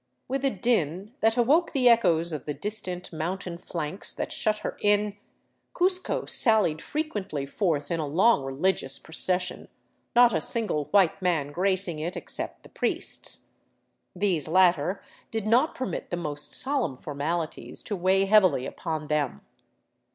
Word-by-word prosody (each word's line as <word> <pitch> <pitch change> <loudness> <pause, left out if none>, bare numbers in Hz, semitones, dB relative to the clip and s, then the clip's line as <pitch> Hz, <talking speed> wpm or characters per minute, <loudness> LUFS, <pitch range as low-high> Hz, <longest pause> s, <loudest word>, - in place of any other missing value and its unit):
With 270 +1 -2
a 275 - +4
din 200 - -1
that 225 +2 +2
awoke 295 +9 +3
the 260 -4 +3
echoes 175 -8 +4
of 150 -2 -6
the 150 - -3
distant 185 -4 -2
mountain 170 +2 -4
flanks 165 +1 -2
that - - -4
shut 215 -1 0
her - - -3
in, 205 0 +2 0.6
Cuzco 370 +1 0
sallied 215 - +4
frequently 210 - -3
forth 150 -2 -1
in 170 - 0
a 155 - -2
long 185 +5 +3
religious 135 +1 -1
procession, 180 +3 0 0.5
not 240 -1 +6
a - - +1
single 210 -11 -1
white 195 +1 +2
man 165 -6 0
gracing 185 -1 0
it, 170 +3 -4
except - - -5
the - - -15
priests. - - 0 0.7
These 180 -6 0
latter 180 +1 +2 0.3
did 225 -2 -3
not 245 +8 +3
permit 260 - -4
the 175 - -3
most 150 -3 -3
solemn 265 - +1
formalities 155 +4 -4
to 205 - -3
weigh 190 +1 +2
heavily 185 -10 +4
upon 155 -1 -5
them. 150 -3 -1
185 Hz, 145 wpm, -26 LUFS, 155-215 Hz, 0.7 s, not